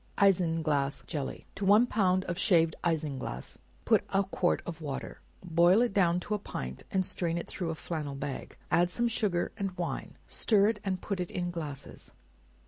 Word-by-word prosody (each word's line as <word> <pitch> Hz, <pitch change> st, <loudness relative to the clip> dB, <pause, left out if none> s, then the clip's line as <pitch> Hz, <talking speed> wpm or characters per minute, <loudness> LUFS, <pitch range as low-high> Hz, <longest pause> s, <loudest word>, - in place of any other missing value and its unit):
Isinglass 160 Hz, -8 st, +2 dB
Jelly. 145 Hz, -4 st, -4 dB
To 200 Hz, -, -6 dB
one 210 Hz, +5 st, +6 dB
ounce 185 Hz, -3 st, +3 dB
of 175 Hz, +1 st, -3 dB
shaved 165 Hz, -6 st, +4 dB
isinglass, 145 Hz, -, -2 dB, 0.3 s
put -, -, +4 dB
a 195 Hz, +1 st, +2 dB
quart 185 Hz, -2 st, 0 dB
of 165 Hz, -1 st, -6 dB
water; 140 Hz, -3 st, -5 dB, 0.2 s
boil 175 Hz, +5 st, +5 dB
it 240 Hz, -, -1 dB
down, 180 Hz, -3 st, +3 dB
to 210 Hz, -, -3 dB
a 210 Hz, -, 0 dB
pint, 65 Hz, -, -6 dB
and 190 Hz, -1 st, +1 dB
strain 170 Hz, -2 st, 0 dB
it 170 Hz, -, -4 dB
through 175 Hz, -3 st, -4 dB
a 160 Hz, -, -2 dB
flannel 155 Hz, -4 st, -4 dB
bag; 140 Hz, 0 st, -5 dB
add 175 Hz, +1 st, +4 dB
some 235 Hz, +6 st, +1 dB
sugar 210 Hz, -7 st, 0 dB
and 195 Hz, -3 st, -3 dB
wine; 175 Hz, -1 st, -4 dB
stir 205 Hz, -2 st, +3 dB
it 225 Hz, -2 st, -2 dB
and 190 Hz, -2 st, -2 dB
put 200 Hz, -3 st, -2 dB
it 180 Hz, -, -2 dB
in 175 Hz, -1 st, -2 dB
glasses. 150 Hz, -5 st, -7 dB
175 Hz, 180 wpm, -30 LUFS, 160-195 Hz, 0.3 s, one